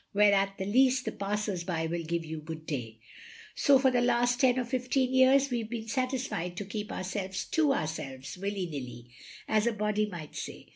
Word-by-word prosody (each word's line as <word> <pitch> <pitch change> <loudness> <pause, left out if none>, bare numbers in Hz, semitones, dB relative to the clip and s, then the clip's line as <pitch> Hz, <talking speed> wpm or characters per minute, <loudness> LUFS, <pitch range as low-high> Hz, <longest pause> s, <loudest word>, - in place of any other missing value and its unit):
" - - -46
Where 205 0 +5
at 195 0 +1
the 190 - -3
least 255 +4 +3
the - - -1
passers 200 -2 -2
by 170 -2 -2
will 170 +1 -2
give 165 0 -2
you 160 0 -5
good 155 +1 -8
day. 120 -8 -4 0.6
So 280 -2 +5
for 265 0 +3
the 245 -1 +2
last 245 0 +2
ten 260 -2 +4
or 255 - +1
fifteen 255 +1 0
years 265 +1 +5
we 240 -1 0
Ve 220 - -6
been 225 -1 -5
satisfied 255 -8 -2
to 205 - -4
keep 210 +1 -5
our - - -4
selves 190 0 -3
to 315 -3 +3
ourselves, 140 - -3
willy 195 0 -3
nilly, 125 -6 -7 0.4
as 215 +1 +2
a - - +3
body 210 0 0
might 165 -5 -8
say. - - -7
205 Hz, 210 wpm, -30 LUFS, 170-250 Hz, 0.6 s, Where